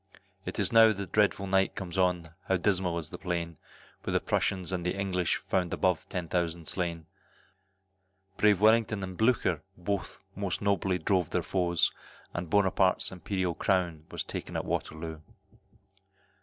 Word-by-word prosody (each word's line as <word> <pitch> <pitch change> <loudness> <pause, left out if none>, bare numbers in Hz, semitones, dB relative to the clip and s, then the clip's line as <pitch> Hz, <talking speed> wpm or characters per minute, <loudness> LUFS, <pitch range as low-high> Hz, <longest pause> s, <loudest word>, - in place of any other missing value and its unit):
It's - - 0
now 115 -1 +8
the 100 -1 -4
dreadful 100 +1 +2
night 95 0 +2
comes 90 -2 -5
on, 90 -3 +1 0.2
how 95 - +3
dismal 90 -2 +1
is 80 -2 -4
the - - -7
plain, 85 -3 -3 0.4
When - - -3
the - - +5
Prussians 95 -1 0
and 90 -2 -2
the 90 - -1
English 95 -3 0
found 90 -2 -1
above 90 -3 0
ten 90 -3 -3
thousand 85 -2 -1
slain, 85 -3 -2 1.3
Brave 105 -3 +4
Wellington 110 -1 +4
and 95 0 -5
Blucher 110 - +2 0.2
bold 90 +1 -3 0.2
most 95 -3 -2
nobly 100 -2 +1
drove 90 -1 +1
their - - 0
foes, 90 -3 +1 0.4
And 90 -1 -4
Buonaparte's 95 -2 +3
Imperial 95 -1 -2
crown 85 -4 0
was - - -3
taken - - -6
at - - -2
Waterloo. 80 0 -3
90 Hz, 150 wpm, -29 LUFS, 85-100 Hz, 1.3 s, now